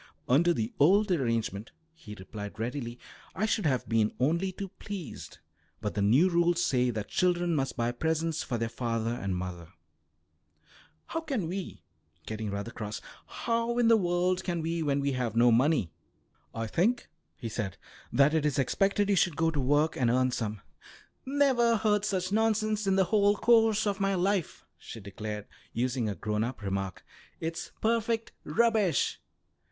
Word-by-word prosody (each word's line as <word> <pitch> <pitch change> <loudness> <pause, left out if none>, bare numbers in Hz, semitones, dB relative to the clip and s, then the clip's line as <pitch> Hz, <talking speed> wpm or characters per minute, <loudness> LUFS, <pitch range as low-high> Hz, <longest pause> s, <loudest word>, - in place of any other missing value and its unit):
"Under 160 +7 +4
the 115 -7 -2
old 195 +7 +5
arrangement," 115 - -1 0.2
he 110 -11 -11
replied 105 +1 -8
readily, 120 +1 -4 0.4
"I 205 - 0
should 215 -5 +1
have 130 -4 0
been 110 -2 +2
only 170 +8 +1
too 195 +1 -6
pleased, 195 -8 -7 0.4
but - - -3
the 100 - -1
new 125 - +5
rules 175 0 +2
say 125 -1 +2
that 110 -3 -3
children 175 -2 +1
must 135 -2 -1
buy 120 0 +1
presents 160 +4 -1
for 120 - -2
their 115 - -1
father 115 -1 -2
and 100 -6 -2
mother." 90 -2 -5 1.4
"How 325 - -3
can 270 - -2
we," 185 +2 -5 0.4
getting 110 -1 -4
rather 100 +3 -4
cross, 105 -1 -5 0.3
"how 230 0 -1
in 240 -1 +4
the 230 - +7
world 180 -1 +1
can 170 -3 -2
we 165 +1 -1
when 140 -2 +1
we 140 0 0
have 125 -4 -2
no 120 +1 +5
money?" 125 - +3 0.6
"I 115 0 -3
think," 215 - +1 0.3
he 115 - -5
said, 105 -4 -4 0.3
"that 140 +5 +4
it 160 -2 +2
is 150 -2 0
expected 195 +9 +2
you 200 - +3
should 175 -4 +2
go 165 0 +2
to 145 -3 -1
work 145 +4 +2
and 120 -3 +1
earn 130 +1 +2
some." 110 -4 -3 0.7
"Never 260 -4 +3
heard 210 -1 +1
such 190 -2 -1
nonsense 215 -1 +1
in 190 - +3
the 190 - +4
whole 205 -1 +5
course 225 -1 +4
of 200 -1 -1
my 195 0 +1
life," 190 -1 -1
she 115 - -9
declared, 105 +1 -6 0.3
using 120 -1 0
a 100 - -3
grown 105 +4 -1
up 120 -2 -5
remark. 95 -1 -3 0.3
"It's 165 +1 -4
perfect 230 0 0
rubbish. 210 +2 +2
155 Hz, 170 wpm, -29 LUFS, -, 1.4 s, the